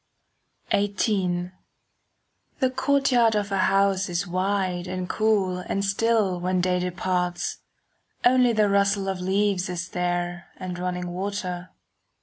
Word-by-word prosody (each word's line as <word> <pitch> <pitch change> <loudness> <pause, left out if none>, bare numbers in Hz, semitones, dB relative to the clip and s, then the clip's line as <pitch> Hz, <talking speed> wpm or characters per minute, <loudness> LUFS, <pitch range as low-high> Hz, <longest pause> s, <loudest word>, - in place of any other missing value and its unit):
XVIII 190 -3 0 1.1
The 260 -2 +2
courtyard 260 -4 +3
of 205 -1 0
her 195 - 0
house 195 -1 +2
is 175 +2 -1
wide 185 -1 -1
And 185 0 -3
cool 200 -4 +1
and 195 +2 -2
still 200 -2 +1
when 180 +1 0
day 180 0 +1
departs. 180 -1 -2 0.7
Only 250 0 +5
the 215 -2 +3
rustle 200 0 +2
of 190 -1 -2
leaves 190 0 +1
is 175 0 -4
there 175 -1 -2
And 180 -1 -5
running 180 0 -3
water. 185 -1 -4
190 Hz, 125 wpm, -25 LUFS, 180-205 Hz, 1.1 s, Only